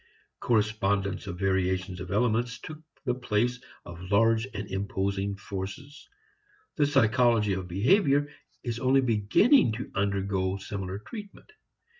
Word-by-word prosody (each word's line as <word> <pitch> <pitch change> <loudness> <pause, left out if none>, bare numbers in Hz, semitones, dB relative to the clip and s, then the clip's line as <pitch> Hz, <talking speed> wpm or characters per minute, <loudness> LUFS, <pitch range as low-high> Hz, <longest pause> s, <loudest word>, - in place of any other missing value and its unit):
Correspondence 105 -3 0
of 90 -2 -5
variations 95 -1 0
of 90 0 -7
elements 115 +3 +1
took 155 -1 -10 0.2
the 125 - +1
place 125 0 -1 0.2
of 85 0 -10
large 115 +3 +3
and 100 -3 -5
imposing 100 0 -2
forces. 100 - -7 0.7
The 145 - +3
psychology 115 -5 +3
of 95 -1 -4
behavior 140 - +3 0.4
is 120 -2 -3
only 130 +2 +3
beginning 120 - +4
to 120 - -6
undergo 100 -1 -1
similar 95 -1 -5
treatment. 205 - -10
105 Hz, 120 wpm, -28 LUFS, 95-125 Hz, 0.7 s, beginning